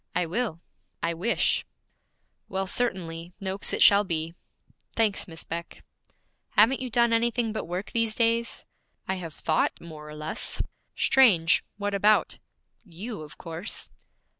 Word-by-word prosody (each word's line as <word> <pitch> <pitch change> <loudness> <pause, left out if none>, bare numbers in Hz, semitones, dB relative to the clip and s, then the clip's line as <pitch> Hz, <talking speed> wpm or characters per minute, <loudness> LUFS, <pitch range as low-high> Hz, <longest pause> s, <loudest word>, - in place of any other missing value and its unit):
'I 180 - +2
will; 190 -1 -2 0.4
I 170 0 +1
wish 190 +8 +2 0.5
' - - -47
'Well, 190 0 -1
certainly; 180 -6 -2
"Noakes" 195 0 -2
it - - +4
shall 205 0 +7
be.' 165 -3 -2 0.6
'Thanks, 220 -3 +2
Miss 165 -2 -6
Beck.' 170 +1 -6 0.7
'Haven't 230 +6 +5
you 255 -1 -4
done 235 0 +3
anything 230 -1 +1
but 220 - -3
work 180 +4 -4
these 230 -2 +1
days?' 230 0 +1 0.4
'I 190 - 0
have 165 -4 -6
thought 155 - 0
more 155 -2 -10
or 150 - -8
less.' 155 +1 -2 0.3
'Strange; 190 -12 +5
what 205 0 -2
about?' 210 +2 +3 0.4
'You, 205 +2 -7
of 150 -1 -11
course.' 170 +4 -5
195 Hz, 140 wpm, -27 LUFS, 165-230 Hz, 0.7 s, shall